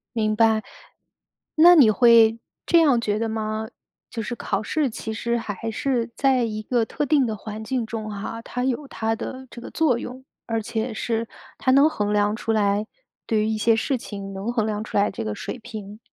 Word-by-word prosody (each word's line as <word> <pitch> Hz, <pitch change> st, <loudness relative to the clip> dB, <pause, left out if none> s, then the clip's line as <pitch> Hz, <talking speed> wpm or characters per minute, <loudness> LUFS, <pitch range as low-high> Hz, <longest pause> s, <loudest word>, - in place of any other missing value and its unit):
明 215 Hz, -1 st, +1 dB
白。 220 Hz, -1 st, +3 dB, 0.9 s
那 345 Hz, +3 st, +8 dB
你 245 Hz, -9 st, +7 dB
会 230 Hz, -1 st, +5 dB, 0.3 s
这 340 Hz, -, +5 dB
样 280 Hz, -7 st, +4 dB
觉 210 Hz, -1 st, -1 dB
得 225 Hz, -, 0 dB
吗？ 220 Hz, 0 st, -3 dB, 0.4 s
就 230 Hz, -, -4 dB
是 240 Hz, -, -4 dB
考 200 Hz, -1 st, -2 dB
试 295 Hz, +2 st, 0 dB
其 220 Hz, 0 st, -6 dB
实 235 Hz, +2 st, -1 dB
还 225 Hz, 0 st, -4 dB
是 240 Hz, -1 st, -1 dB
在 265 Hz, -3 st, +2 dB
一 215 Hz, -1 st, -3 dB
个 235 Hz, -1 st, +1 dB
特 295 Hz, -, -2 dB
定 280 Hz, -2 st, +3 dB
的 220 Hz, -2 st, -2 dB
环 215 Hz, +2 st, -7 dB
境 240 Hz, 0 st, -2 dB
中 220 Hz, -1 st, -5 dB
哈， 210 Hz, +3 st, -5 dB
它 250 Hz, +2 st, -4 dB
有 265 Hz, +2 st, -1 dB
它 225 Hz, -2 st, -2 dB
的 260 Hz, +3 st, -7 dB
这 235 Hz, -, -9 dB
个 -, -, -8 dB
作 275 Hz, -7 st, +2 dB
用。 255 Hz, +1 st, -8 dB, 0.2 s
而 225 Hz, -1 st, -1 dB
且 225 Hz, +1 st, -3 dB
是 225 Hz, 0 st, -2 dB, 0.3 s
它 260 Hz, -, +1 dB
能 280 Hz, +4 st, +6 dB
衡 210 Hz, -6 st, -1 dB
量 205 Hz, +1 st, +2 dB
出 225 Hz, -1 st, -2 dB
来 205 Hz, -1 st, +1 dB, 0.4 s
对 215 Hz, -2 st, +1 dB
于 215 Hz, -, 0 dB
一 220 Hz, -1 st, -1 dB
些 225 Hz, +1 st, +3 dB
事 255 Hz, +3 st, 0 dB
情 200 Hz, -3 st, -7 dB
能 200 Hz, +5 st, -3 dB
衡 225 Hz, -3 st, +1 dB
量 210 Hz, 0 st, -2 dB
出 -, -, -9 dB
来 200 Hz, -, +3 dB
这 190 Hz, -, -5 dB
个 105 Hz, -, -2 dB
水 -, -, -6 dB
平。 210 Hz, -1 st, -9 dB
225 Hz, 225 characters per minute, -23 LUFS, 215-250 Hz, 0.9 s, 那